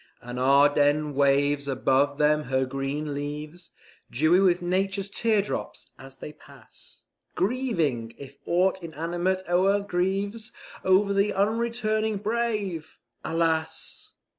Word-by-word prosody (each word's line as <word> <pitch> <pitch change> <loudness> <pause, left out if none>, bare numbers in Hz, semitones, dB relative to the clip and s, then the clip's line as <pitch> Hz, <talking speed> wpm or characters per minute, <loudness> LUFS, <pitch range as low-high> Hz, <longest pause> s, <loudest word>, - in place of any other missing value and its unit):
And 125 +1 -7
Ardennes 145 +2 +3
waves 140 +1 +2
above 135 +1 +1
them 150 0 +2
her 130 +1 0
green 135 +3 -3
leaves, 150 +4 -6 0.4
Dewy 155 +8 +3
with 180 -2 +3
nature's 190 +2 -1
teardrops, 215 -3 -2
as 135 0 -12
they 150 - -9
pass, - - -15 0.3
Grieving, 170 - -1
if 140 0 -11
aught 185 +2 +2
inanimate 175 +3 -2
e'er 190 +3 +3
grieves, 200 +4 -2 0.3
Over 200 +2 +3
the 200 +1 +1
unreturning 220 +1 0
brave, 210 -6 -2 0.3
alas! 160 -1 -2
170 Hz, 110 wpm, -26 LUFS, 145-200 Hz, 0.4 s, Ardennes